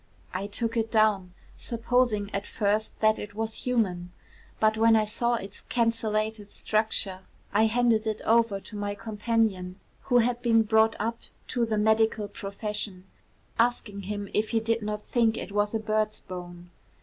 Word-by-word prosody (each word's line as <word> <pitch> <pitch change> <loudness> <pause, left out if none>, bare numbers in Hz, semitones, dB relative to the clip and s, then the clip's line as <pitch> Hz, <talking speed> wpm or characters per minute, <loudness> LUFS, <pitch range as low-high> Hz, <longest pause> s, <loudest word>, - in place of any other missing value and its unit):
I 190 +2 -2
took 230 +3 -2
it 225 -1 0
down, 210 -5 +2 0.2
supposing 230 -3 0
at 200 +1 -2
first 215 +1 -1
that 215 0 +4
it 210 0 -7
was 225 +2 -3
human; 185 -8 0 0.5
but 215 0 +3
when 225 +1 +5
I 215 -1 +3
saw 235 +3 0
its 200 -3 -7
cancellated 220 -2 0
structure, 215 -4 -1 0.3
I 220 +1 +4
handed 225 -1 +2
it 215 - -1
over 230 -3 +3
to 215 - -11
my 205 0 -3
companion, 210 -3 -1 0.3
who 245 - +3
had 240 0 +2
been 225 -2 +4
brought 220 +1 +3
up 230 +2 -2 0.3
to 240 -2 0
the 220 -1 0
medical 220 0 +2
profession, 200 -1 -5 0.5
asking 230 -4 +1
him 205 -1 -3
if 215 +1 +1
he 230 - +2
did 230 +1 0
not 210 0 -3
think 230 -2 +2
it - - -5
was 205 +1 0
a - - +1
bird's 215 0 0
bone. 175 -1 -9
215 Hz, 160 wpm, -27 LUFS, 205-230 Hz, 0.5 s, when